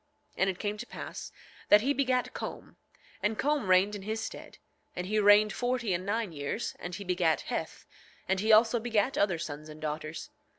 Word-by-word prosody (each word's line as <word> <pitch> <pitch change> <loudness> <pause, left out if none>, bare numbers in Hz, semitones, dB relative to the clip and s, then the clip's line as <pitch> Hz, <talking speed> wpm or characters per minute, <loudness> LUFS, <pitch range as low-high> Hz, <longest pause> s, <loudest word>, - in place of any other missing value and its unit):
9:25 - - -42
And 190 - +3
it 185 - -3
came 210 +1 -3
to 245 - -6
pass - - -7 0.4
that 205 - +8
he 275 +5 +1
begat 255 -3 0
Com, - - -7 0.5
and 210 +1 0
Com 290 -8 0
reigned 185 +3 +5
in 205 - -5
his 215 +3 -3
stead; 220 - -7 0.4
and 180 - -3
he 215 +3 +1
reigned 210 +1 +6
forty 245 -4 -1
and 185 +2 -3
nine 220 -2 -1
years, 145 +9 -3
and 175 0 -5
he 200 - -6
begat 180 -4 +1
Heth; - - -5 0.4
and 190 0 +1
he 215 +3 +2
also 225 +2 +6
begat 230 +2 0
other 195 -4 +2
sons 155 -1 -6
and 155 0 -10
daughters. 155 +1 -5
205 Hz, 200 wpm, -30 LUFS, 180-225 Hz, 0.5 s, that